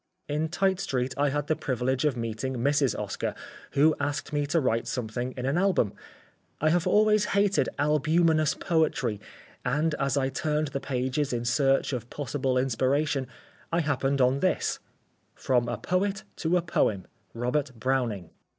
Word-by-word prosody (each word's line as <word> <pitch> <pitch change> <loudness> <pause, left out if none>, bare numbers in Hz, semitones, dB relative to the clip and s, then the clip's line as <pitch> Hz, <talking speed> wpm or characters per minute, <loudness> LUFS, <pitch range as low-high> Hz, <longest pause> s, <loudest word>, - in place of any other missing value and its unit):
In 150 +2 -1
Tite 190 +2 +1
street 130 -5 -1
I 145 0 +2
had 145 +1 -1
the 155 - +1
privilege 130 -2 -1
of 140 -4 +1
meeting 115 +3 -3
Mrs. 140 0 +1
Oscar, - - -3 0.4
who 155 +3 +4
asked 145 +1 -3
me 145 -1 0
to 165 +4 +2
write 115 -5 0
something 125 +1 -3
in 125 - -3
an 140 +6 +1
album. 185 - +2 0.7
I 155 +1 +3
have 175 0 +1
always 215 0 +4
hated 200 0 +3
albumenous 155 +2 +2
poetry 150 - 0 0.4
and, 150 +5 +1
as 140 0 +1
I 135 -1 +1
turned 150 +1 -1
the 140 - -3
pages 130 +2 -1
in 120 -1 -2
search 135 +3 +2
of 120 -1 -4
possible 135 -1 -1
inspiration, 135 +2 +1 0.4
I 170 +1 +2
happened 140 -2 0
on 130 +2 +3
this: 185 +3 0 0.6
_From 120 -2 +1
a - - -2
poet 195 +2 -1
to 170 +2 +1
a 175 - 0
poem. 105 - 0 0.3
Robert 130 +4 -1
Browning. 120 -9 -1
140 Hz, 160 wpm, -27 LUFS, 125-155 Hz, 0.7 s, who